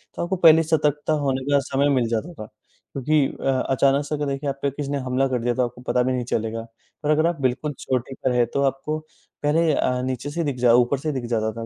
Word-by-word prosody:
तो -, -, -2 dB
आपको 185 Hz, +2 st, -1 dB
पहले 165 Hz, -2 st, +7 dB
ही -, -, -1 dB
सतर्कता 150 Hz, -1 st, +1 dB
होने 135 Hz, -1 st, 0 dB
का 140 Hz, -, +5 dB
समय 140 Hz, +1 st, 0 dB
मिल 120 Hz, -3 st, +1 dB
जाता 130 Hz, +10 st, -2 dB
था। 110 Hz, -, -8 dB
क्योंकि 140 Hz, +6 st, -2 dB
अ, 135 Hz, -, -4 dB, 0.2 s
अचानक 135 Hz, +2 st, +2 dB
से 150 Hz, -, -2 dB
अगर 145 Hz, 0 st, -2 dB
देखिए 140 Hz, +1 st, -2 dB
आप 135 Hz, 0 st, -5 dB
पे 140 Hz, -, +1 dB
किसी 140 Hz, 0 st, -5 dB
ने 140 Hz, -, 0 dB
हमला 130 Hz, +1 st, 0 dB
कर 125 Hz, -2 st, -1 dB
दिया 120 Hz, 0 st, 0 dB
तो 125 Hz, -1 st, +2 dB
आपको 120 Hz, +1 st, -9 dB
पता 125 Hz, -, +2 dB
भी 130 Hz, 0 st, 0 dB
नहीं 125 Hz, -1 st, -1 dB
चलेगा, 115 Hz, -1 st, -2 dB, 0.4 s
पर 150 Hz, -, -1 dB
अगर 155 Hz, +2 st, +3 dB
आप 165 Hz, -5 st, -2 dB
बिल्कुल 135 Hz, +4 st, -1 dB
चोटी 130 Hz, +1 st, -2 dB
पर 130 Hz, -, +2 dB
हैं 120 Hz, -1 st, +4 dB
तो 140 Hz, -, +1 dB
आपको 135 Hz, +3 st, -2 dB, 0.5 s
पहले 155 Hz, +1 st, +3 dB
अ, 125 Hz, -2 st, 0 dB
नीचे 130 Hz, +2 st, -3 dB
से 170 Hz, +2 st, -2 dB
दिख 140 Hz, -4 st, -2 dB
जा 120 Hz, -1 st, +5 dB
ऊपर 125 Hz, +3 st, +3 dB
से 155 Hz, +1 st, -2 dB
दिख 130 Hz, -4 st, -4 dB
जाता 110 Hz, 0 st, 0 dB
था 115 Hz, -, -5 dB
135 Hz, 260 wpm, -23 LUFS, 125-150 Hz, 0.5 s, पहले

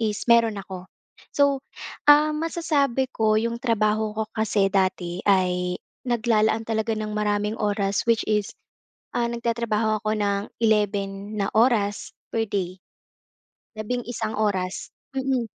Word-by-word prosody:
is 215 Hz, -2 st, -1 dB
meron 230 Hz, -2 st, +4 dB
ako. 190 Hz, -2 st, -8 dB, 0.5 s
So, 280 Hz, -1 st, +3 dB, 0.5 s
ah, 300 Hz, +1 st, +7 dB
masasabi 300 Hz, -5 st, 0 dB
ko 215 Hz, -1 st, +2 dB
yung 235 Hz, +1 st, -1 dB
trabaho 215 Hz, -2 st, 0 dB
ko 220 Hz, -, 0 dB
kasi 210 Hz, -3 st, +1 dB
dati 185 Hz, -2 st, 0 dB
ay 180 Hz, -2 st, +2 dB, 0.3 s
naglalaan 225 Hz, -2 st, +2 dB
talaga 220 Hz, 0 st, -1 dB
ng 215 Hz, 0 st, -4 dB
maraming 210 Hz, +1 st, -1 dB
oras 200 Hz, -1 st, 0 dB
which 230 Hz, -1 st, +3 dB
is, 210 Hz, -1 st, -1 dB, 0.6 s
ah, 240 Hz, -1 st, 0 dB
nagtatrabaho 230 Hz, -2 st, -1 dB
ako 215 Hz, 0 st, 0 dB
nang 200 Hz, -1 st, 0 dB, 0.2 s
11 205 Hz, -1 st, 0 dB
na 200 Hz, 0 st, -1 dB
oras 215 Hz, -3 st, +2 dB, 0.2 s
per 225 Hz, -1 st, 0 dB
day. 185 Hz, -2 st, -3 dB, 1.0 s
Labing-isang 225 Hz, 0 st, -3 dB
oras, 190 Hz, -3 st, -1 dB, 0.2 s
mm. 265 Hz, -2 st, 0 dB
215 Hz, 125 wpm, -24 LUFS, 200-235 Hz, 1.0 s, ah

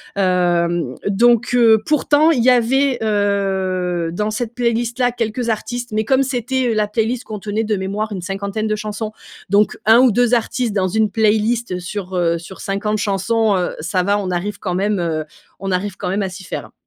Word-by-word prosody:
hem, 175 Hz, -6 st, +1 dB
donc 235 Hz, +3 st, +3 dB
heu, 230 Hz, -2 st, +6 dB
pourtant 300 Hz, +1 st, +3 dB
il 255 Hz, -, +1 dB
y 255 Hz, -, +5 dB
avait, 255 Hz, +2 st, +2 dB
heu, 190 Hz, -5 st, 0 dB
dans 210 Hz, +4 st, -1 dB
cette 235 Hz, +1 st, -4 dB
playlist-là 240 Hz, +1 st, 0 dB
quelques 235 Hz, 0 st, -2 dB
artistes 240 Hz, +3 st, -3 dB
mais 215 Hz, 0 st, -1 dB
comme 265 Hz, +2 st, +3 dB
c'était, 255 Hz, 0 st, -1 dB
heu, -, -, +1 dB
la 215 Hz, -1 st, +1 dB
playlist 225 Hz, +3 st, -1 dB
contenait 215 Hz, +1 st, -3 dB
de 215 Hz, 0 st, 0 dB
mémoire 205 Hz, +3 st, -3 dB
une 190 Hz, -, -5 dB
50ne 200 Hz, +3 st, -3 dB
de 215 Hz, -, -1 dB
chansons, 215 Hz, 0 st, -4 dB, 0.4 s
donc 205 Hz, +1 st, +3 dB
1 225 Hz, +3 st, +7 dB
ou 255 Hz, -2 st, +5 dB
2 245 Hz, +2 st, +2 dB
artistes 240 Hz, -1 st, 0 dB
dans 190 Hz, -2 st, +1 dB
une 220 Hz, +3 st, +1 dB
playlist, 220 Hz, +1 st, +1 dB
heu, -, -, -2 dB
sur, 190 Hz, 0 st, -6 dB
heu, 170 Hz, -1 st, +1 dB
sur 175 Hz, +3 st, -11 dB
50 210 Hz, +2 st, -2 dB
chansons, 210 Hz, +2 st, +1 dB
heu, 180 Hz, -, -2 dB
ça 185 Hz, -3 st, -1 dB
va 200 Hz, +2 st, +2 dB
on 195 Hz, -2 st, -3 dB
arrive 195 Hz, +3 st, -3 dB
quand 180 Hz, -3 st, -3 dB
même, 200 Hz, +1 st, 0 dB
heu, 160 Hz, -2 st, -2 dB, 0.3 s
on 195 Hz, -1 st, -3 dB
arrive 190 Hz, +2 st, -2 dB
quand -, -, -3 dB
même 195 Hz, +3 st, 0 dB
à 195 Hz, -, -1 dB
s'y 185 Hz, +1 st, -10 dB
faire. -, -, -6 dB
210 Hz, 195 wpm, -19 LUFS, 190-235 Hz, 0.4 s, 1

